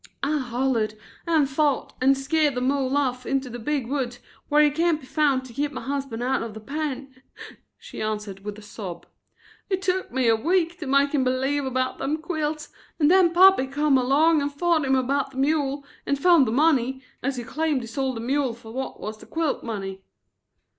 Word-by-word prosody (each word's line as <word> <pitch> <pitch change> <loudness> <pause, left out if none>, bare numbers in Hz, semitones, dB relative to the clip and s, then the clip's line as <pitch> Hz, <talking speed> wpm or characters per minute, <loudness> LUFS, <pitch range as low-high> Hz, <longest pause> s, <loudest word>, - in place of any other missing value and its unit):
"I 300 +2 +1
hollered 240 -4 -1 0.3
and 315 -4 +3
fought 285 +1 0
and 270 +1 +4
skeered 290 +1 +1
the 250 - -1
mule 270 +1 +1
off 255 -3 0
into 270 -1 -2
the 240 - -6
big 280 +1 -1
woods 250 -2 -2 0.3
where 300 0 +5
he 295 - +4
can't 325 +1 +1
be 270 - -14
found 275 -2 +1
to 245 - -12
keep 290 +3 -1
my - - -6
husband 270 -4 -3
out 265 +2 0
of 225 -2 -6
the - - -7
pen," 275 0 -5 0.6
she - - -9
answered 210 -2 -3
with 210 0 -6
a 215 - -12
sob. 190 -5 -8 0.6
"It 380 -2 0
took 375 0 -1
me 255 -1 +1
a 225 - +5
week 340 +7 0
to 310 - -5
make 280 +1 +3
him 285 -3 +1
believe 265 +2 0
about 260 0 -1
them 285 +3 -1
quilts 310 -2 -3 0.3
and 300 0 +4
then 370 -2 +5
pappy 365 -5 +6
come 290 +1 +2
along 290 +5 +4
and 285 0 -1
fought 320 +1 +1
him 265 0 +3
about 270 +2 0
the 265 - -13
mule 280 0 0 0.2
and 280 - +1
found 325 -3 +5
the - - -1
money, 265 -2 +2 0.2
as 275 +1 -1
he 240 - -4
claimed 300 +3 -1
he 230 - -7
sold 260 +2 -2
the 225 - -5
mule 260 0 0
fer 230 -1 -12
what 265 +3 -5
was 215 +1 -6
the - - -14
quilt 320 -3 -1
money." 195 -4 -5
270 Hz, 205 wpm, -24 LUFS, 250-300 Hz, 0.6 s, pappy